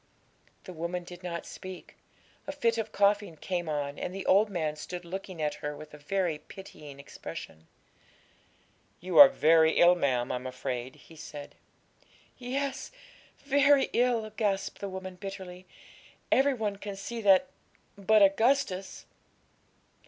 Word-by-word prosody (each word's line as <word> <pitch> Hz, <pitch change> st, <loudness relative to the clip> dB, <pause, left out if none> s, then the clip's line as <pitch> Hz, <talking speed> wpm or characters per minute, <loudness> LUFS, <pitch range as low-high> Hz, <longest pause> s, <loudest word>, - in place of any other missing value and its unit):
The 185 Hz, -, -9 dB
woman 170 Hz, +2 st, -4 dB
did 175 Hz, 0 st, -11 dB
not 170 Hz, -2 st, -5 dB
speak; 185 Hz, -1 st, -10 dB, 0.5 s
a -, -, -2 dB
fit 235 Hz, -5 st, 0 dB
of 225 Hz, -1 st, -3 dB
coughing 200 Hz, -4 st, +1 dB
came 175 Hz, 0 st, -3 dB
on, 145 Hz, -1 st, -3 dB
and 180 Hz, -, -4 dB
the 195 Hz, -, -5 dB
old 205 Hz, +3 st, +4 dB
man 160 Hz, -6 st, -2 dB
stood 175 Hz, +3 st, -7 dB
looking 185 Hz, 0 st, -7 dB
at 150 Hz, -, 0 dB
her 150 Hz, 0 st, -4 dB
with 155 Hz, 0 st, -12 dB
a 150 Hz, -, -11 dB
very 170 Hz, 0 st, -1 dB
pitying 150 Hz, -8 st, -12 dB
expression. 80 Hz, -, -9 dB, 1.3 s
'You 180 Hz, +1 st, +1 dB
are 285 Hz, -1 st, +12 dB
very 160 Hz, -, +4 dB
ill, 175 Hz, +1 st, +6 dB
ma'am, 130 Hz, -8 st, 0 dB
I'm 125 Hz, +1 st, -4 dB
afraid,' 125 Hz, 0 st, -5 dB
he 165 Hz, -, -17 dB
said. 150 Hz, -2 st, -9 dB, 0.9 s
'Yes, 265 Hz, +2 st, -3 dB, 0.5 s
very 280 Hz, 0 st, +4 dB
ill,' 235 Hz, -3 st, +1 dB
gasped 200 Hz, -3 st, -1 dB
the 200 Hz, -, -4 dB
woman 185 Hz, -1 st, -7 dB
bitterly; 185 Hz, -1 st, -8 dB, 0.6 s
'every 270 Hz, +1 st, +4 dB
one 210 Hz, -4 st, -2 dB
can 200 Hz, 0 st, -7 dB
see 230 Hz, +4 st, -6 dB
that 200 Hz, +5 st, +5 dB, 0.5 s
but 210 Hz, +1 st, +4 dB
Augustus!' 200 Hz, -1 st, +1 dB
185 Hz, 140 wpm, -29 LUFS, 160-215 Hz, 1.3 s, are